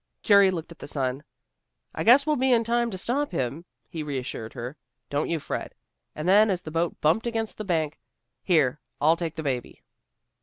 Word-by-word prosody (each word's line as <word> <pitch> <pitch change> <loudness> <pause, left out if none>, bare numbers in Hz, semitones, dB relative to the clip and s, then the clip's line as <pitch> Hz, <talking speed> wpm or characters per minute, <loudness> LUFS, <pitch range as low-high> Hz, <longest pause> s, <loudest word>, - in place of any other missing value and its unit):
Jerry 200 -3 +6
looked 170 -3 -4
at 170 - -13
the - - -8
sun. 135 -1 -2 0.7
"I - - -3
guess 260 +5 +7
we'll 305 -1 +2
be 260 0 +2
in 235 -2 +4
time 235 +1 +1
to 190 - -5
stop 270 +8 -1
him," 145 +1 -3 0.2
he 160 - -6
reassured 130 -6 -5
her. 125 +3 -6 0.4
"Don't 145 +1 0
you 165 - 0
fret." - - -5 0.4
And 155 +3 -4
then, 210 +3 +6
as 185 -2 -1
the 155 - -7
boat 165 +1 -1
bumped 170 +10 +2
against 225 -2 -3
the - - -2
bank, 160 -4 -1 0.4
"Here, 150 -6 +2 0.2
I'll 160 +3 +4
take 165 -2 -4
the 160 - -5
baby." 130 -4 -4
165 Hz, 195 wpm, -26 LUFS, 145-220 Hz, 0.7 s, guess